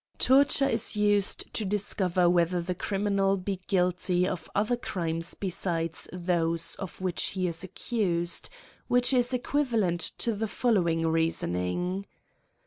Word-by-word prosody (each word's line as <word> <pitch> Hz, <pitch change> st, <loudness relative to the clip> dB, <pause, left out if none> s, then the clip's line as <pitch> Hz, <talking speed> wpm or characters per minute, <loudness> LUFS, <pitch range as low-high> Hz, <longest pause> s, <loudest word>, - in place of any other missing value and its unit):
Torture 275 Hz, +1 st, +4 dB
is -, -, 0 dB
used 205 Hz, -1 st, +1 dB
to 220 Hz, -, -2 dB
discover 190 Hz, -3 st, +1 dB
whether 175 Hz, 0 st, +2 dB
the 180 Hz, +2 st, -2 dB
criminal 195 Hz, +1 st, 0 dB
be 190 Hz, 0 st, -4 dB
guilty 180 Hz, -1 st, +1 dB
of 185 Hz, -3 st, -4 dB
other 215 Hz, +4 st, +2 dB
crimes 165 Hz, -7 st, -3 dB
besides 175 Hz, -3 st, -1 dB
those 170 Hz, -2 st, 0 dB
of 190 Hz, -1 st, -8 dB
which 185 Hz, -3 st, -1 dB
he 185 Hz, -1 st, -1 dB
is 170 Hz, +1 st, -3 dB
accused, 180 Hz, -3 st, -2 dB, 0.4 s
which 245 Hz, +2 st, +3 dB
is 245 Hz, -1 st, +2 dB
equivalent 245 Hz, -9 st, 0 dB, 0.2 s
to 230 Hz, -, 0 dB
the 220 Hz, +2 st, -2 dB
following 175 Hz, -9 st, +1 dB
reasoning. 165 Hz, -, -1 dB
185 Hz, 130 wpm, -28 LUFS, 170-210 Hz, 0.4 s, Torture